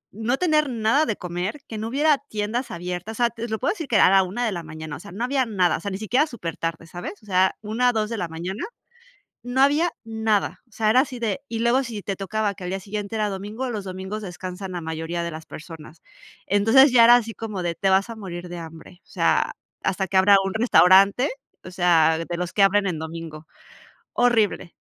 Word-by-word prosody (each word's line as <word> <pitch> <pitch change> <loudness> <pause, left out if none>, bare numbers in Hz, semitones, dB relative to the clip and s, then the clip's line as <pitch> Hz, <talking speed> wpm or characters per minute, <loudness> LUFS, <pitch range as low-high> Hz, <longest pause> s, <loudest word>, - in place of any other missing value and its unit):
no 235 +4 -1
tener 305 -5 +2
nada 235 +5 +2
de 215 - -1
comer, 180 +9 -4
que 220 - -6
no 220 - -3
hubiera 290 +2 +3
tiendas 215 +4 -2
abiertas, 180 +5 -5
o 245 - +1
sea, 235 - +4
te 230 0 -6
lo 220 - -1
puedo 275 - +1
decir 325 -8 -6
que 230 - -1
era - - +7
a - - +4
la 195 0 +6
1 210 +7 -3
de 220 - 0
la 175 - -4
mañana, 155 -1 -7
o - - -13
sea, 200 - -11
no 205 +7 -4
había 265 0 +1
nada, 185 -6 +1
o - - -9
sea, 200 - -4
ni 190 - -3
siquiera 250 +8 +1
supertarde, 165 - -5
¿sabes?, 175 +2 -7
o - - -17
sea, 190 -1 +2
1, 225 +4 +1
2 215 -1 -1
de 230 - -2
la 175 - -2
mañana, 175 +6 -5 0.8
no 245 +2 0
había 295 +5 +4
nada, 220 -2 -1
o - - -34
sea, 215 -1 +1
era 250 - +5
así 260 -3 -5
de, 230 +2 -1
y 225 -1 -3
luego 240 +3 +2
si 225 -5 -6
te 195 - -3
tocaba 205 +1 -1
que 180 - -9
al - - -3
día 195 - -2
siguiente 205 +2 -5
era 210 -1 0
domingo, 210 +6 -5
los 210 -4 -4
domingos 190 +3 -6
descansan 185 +1 -7
la 175 - -4
mayoría 160 +1 -4
de 170 - -4
las 160 0 -8
personas. 155 -1 -11 0.5
Entonces, 225 +8 +5
ya 235 -2 +8
era 240 +1 +9
así 230 -2 0
como 210 -5 -5
de: 170 -1 -1
“Te 195 - 0
vas 195 +4 +3
a 230 - -7
morir 180 -4 -7
de 175 - -6
hambre", 165 +2 -11
o - - -34
sea, - - +1 0.3
hasta 190 0 -1
que 190 - +1
abra 195 +1 +6
un 195 - -2
restaurante, 200 +2 +5 0.3
o 185 - -9
sea, 170 -3 +3
de 170 +1 -4
los 180 -1 -3
que 200 - +4
abren 200 0 +3
en 165 -4 -2
domingo, 160 -1 -8 0.7
horrible. 225 -7 +1
205 Hz, 235 wpm, -23 LUFS, 180-230 Hz, 0.8 s, era